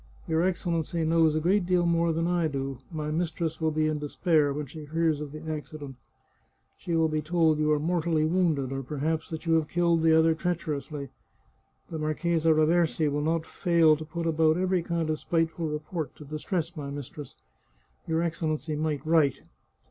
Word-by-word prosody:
Your 160 0 +1
Excellency 170 -2 -1
knows 160 -1 +3
a - - +2
great 185 +5 +2
deal 180 -1 +3
more 170 0 +2
than 165 +1 0
I 175 -1 +1
do; 135 -3 -4
my 150 -2 -3
mistress 165 0 -2
will 160 - +2
be 155 0 0
in 155 -1 -1
despair 150 0 +1
when 150 +1 -3
she 150 +3 -9
hears 160 0 0
of 150 -2 -6
the 155 +1 -9
accident. 150 -3 -6 0.8
She 170 - -3
will 160 -1 +3
be 155 0 -1
told 160 -1 +2
you 155 0 +2
are 150 - +4
mortally 165 -1 +1
wounded, 160 -6 +1
or 135 0 -3
perhaps 155 +4 -2
that 160 +1 -6
you 165 - +2
have 160 -2 +2
killed 170 -1 +2
the 160 0 +5
other 160 0 +4
treacherously. 155 -4 -3 0.8
The 160 - -4
Marchesa 160 +1 0
Raversi 155 -1 +2
will 145 +1 -1
not 160 +1 0
fail 170 -4 +3
to 155 - -7
put 165 +2 -5
about 160 0 +3
every 185 -1 +1
kind 170 -1 -2
of 155 -1 -1
spiteful 165 0 -1
re 150 - -1
port 155 0 -5
to 150 - -12
distress 165 +4 -3
my 145 -3 -5
mistress. 140 0 -8 0.7
Your 165 0 +1
Excellency 155 -2 -2
might 150 -1 -2
write." 155 -4 +2
160 Hz, 185 wpm, -27 LUFS, 150-170 Hz, 0.8 s, the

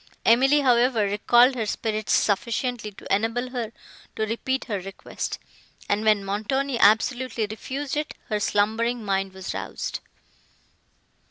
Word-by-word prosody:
Emily, 270 +5 +5
however, 245 -3 +3
recalled 240 +6 +4
her 225 -4 -2
spirits 215 0 -2
sufficiently 230 +2 0
to 195 - -5
enable 230 +4 -2
her 235 -4 -3 0.4
to 220 - 0
repeat 260 +4 -2
her 205 -4 -2
request. 195 +1 -6 0.5
And, 205 +1 0
when 210 -2 +3
Montoni 235 +6 -1
absolutely 230 +2 +3
refused 265 +7 -5
it, 300 +1 -3
her 210 - 0
slumbering 220 +3 0
mind 195 -1 0
was 190 -1 -6
roused. 95 0 -4
225 Hz, 125 wpm, -25 LUFS, 205-250 Hz, 0.5 s, Emily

